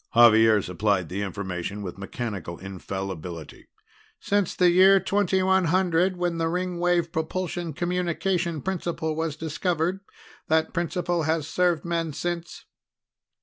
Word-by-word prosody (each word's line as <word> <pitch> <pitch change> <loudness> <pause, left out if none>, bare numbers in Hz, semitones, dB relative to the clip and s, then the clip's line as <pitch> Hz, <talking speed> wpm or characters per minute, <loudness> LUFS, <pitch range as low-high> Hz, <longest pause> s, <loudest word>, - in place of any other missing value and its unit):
Xavier 110 -3 +7
supplied 95 -1 0
the 95 +3 -3
information 100 0 -4
with 95 0 -7
mechanical 100 -4 -5
infallibility. 95 -3 -7 0.5
"Since 205 -2 0
the 180 -1 +4
year 190 +2 +7
2100 185 -2 +2
when 175 -1 -1
the 165 0 +1
Ringwave 175 -1 0
propulsion 170 +1 -3
communication 175 -1 -1
principle 170 -4 -2
was 160 -2 -2
discovered. 165 +3 -1 0.5
That 160 0 +1
principle 175 0 -1
has 160 -2 0
served 175 -2 +1
men 165 -2 -1
since." 175 +2 -4
165 Hz, 110 wpm, -25 LUFS, 110-180 Hz, 0.5 s, Xavier